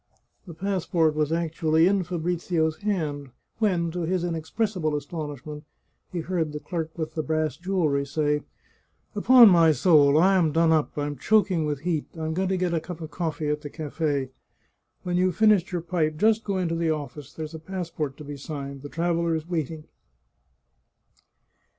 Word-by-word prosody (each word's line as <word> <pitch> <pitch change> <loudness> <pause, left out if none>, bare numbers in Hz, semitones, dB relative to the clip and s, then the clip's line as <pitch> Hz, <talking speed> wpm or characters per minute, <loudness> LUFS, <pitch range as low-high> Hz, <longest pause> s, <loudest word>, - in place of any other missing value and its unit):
The 170 - -9
passport 175 -4 0
was 150 0 0
actually 165 -1 +2
in 195 +1 +3
Fabrizio's 170 -2 -1
hand 155 -9 -2 0.3
when, 175 -6 +1
to 175 - -4
his 175 +1 -1
inex 165 -2 -4
pressible 185 -9 0
astonishment, 150 0 -6 0.5
he 175 - -3
heard 160 -3 -2
the 150 - -4
clerk 165 -1 -4
with 160 -2 -4
the 160 - -1
brass 155 -2 -1
jewellery 170 -5 0
say: 150 0 0 0.4
" - - -42
Upon 235 +3 +8
my 165 -3 +6
soul! 145 -1 +5
I 190 +4 +5
am 165 -4 +2
done 165 +1 +3
up; 155 -2 +1
I'm 145 -1 -2
choking 185 -1 +2
with 145 -2 -3
heat; 160 -2 -1
I 160 - -3
am 160 - -2
going 185 +2 -1
to 190 - +1
get 180 -1 0
a 165 - +2
cup 170 +1 -8
of 160 -2 -7
cofifee 160 -3 -2
at 150 0 -2
the 145 - -7
cafe. 145 -3 -2 0.7
When 175 0 -1
you've 185 -1 +2
finished 210 -2 +4
your 175 -2 -2
pipe 160 -3 -1
just 220 +4 +3
go 200 -2 -2
into 175 -3 -1
the 165 -1 0
office; 150 -2 -4
there's 155 0 -7
a 160 - -6
passport 160 -5 -5
to - - -9
be 145 0 -7
signed. 140 -1 -6
The 145 - -8
traveller 170 0 0
is 160 0 -4
waiting." 160 -2 -3
160 Hz, 180 wpm, -25 LUFS, 150-180 Hz, 0.7 s, Upon